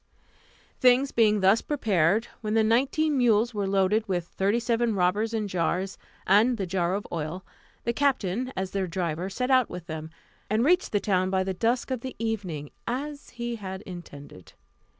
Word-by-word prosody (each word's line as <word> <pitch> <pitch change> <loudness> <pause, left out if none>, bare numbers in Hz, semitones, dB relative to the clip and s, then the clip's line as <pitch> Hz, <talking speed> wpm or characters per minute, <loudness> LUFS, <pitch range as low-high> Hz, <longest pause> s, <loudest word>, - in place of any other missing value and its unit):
Things 255 +1 +4
being 215 -3 +3
thus 195 +4 +5
prepared, 210 - +1 0.2
when 215 0 -2
the 225 - +4
nineteen 275 +7 +2
mules 235 -1 +3
were 205 -2 -1
loaded 195 +3 +2
with 175 -3 -1
thirty 200 +6 0
seven 235 -1 0
robbers 200 +5 +1
in 220 -2 -1
jars, 185 +1 -1 0.3
and 220 +6 +4
the 195 - -2
jar 180 0 0
of 205 - -4
oil, 170 +3 -4 0.4
the 235 - 0
captain, 255 -3 0
as 190 0 -2
their 195 -2 -1
driver, 175 0 -2
set 250 +6 -2
out 255 -1 +4
with 180 -1 -7
them, 160 -2 -6 0.4
and 220 +4 +2
reached 360 +4 +3
the 205 - +2
town 185 -2 +1
by 190 0 +1
the 190 0 -2
dusk 235 +7 0
of 255 -3 -2
the 260 0 -6
evening, 190 -10 -3 0.2
as 280 +4 -4
he 235 -1 -4
had 190 -1 -7
intended. 145 - -11
205 Hz, 175 wpm, -27 LUFS, 185-235 Hz, 0.4 s, thus